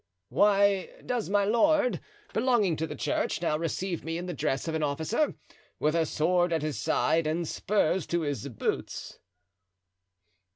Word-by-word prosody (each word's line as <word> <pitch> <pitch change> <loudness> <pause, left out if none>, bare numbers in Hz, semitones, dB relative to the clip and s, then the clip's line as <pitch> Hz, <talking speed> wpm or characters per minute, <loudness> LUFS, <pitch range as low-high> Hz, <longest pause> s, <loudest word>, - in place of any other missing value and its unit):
"Why 200 -1 +3 0.2
does 245 -5 -2
my 200 0 +3
lord, 250 +5 +3 0.3
belonging 225 -10 +2
to 160 - -2
the 150 - -6
church, - - -1
now 165 -2 0
receive 170 +2 -2
me 165 +1 -3
in 175 - -4
the 180 - -4
dress 135 0 -1
of 160 - -2
an 160 - -1
officer, 160 - 0 0.4
with 155 +1 +1
a 165 -1 +2
sword 175 +3 +2
at 160 -2 0
his 155 -2 -2
side 160 0 +1
and 165 +2 -1
spurs 190 -3 0
to 170 0 0
his 145 -6 -3
boots?" 120 -6 -4
170 Hz, 160 wpm, -28 LUFS, 155-200 Hz, 0.4 s, Why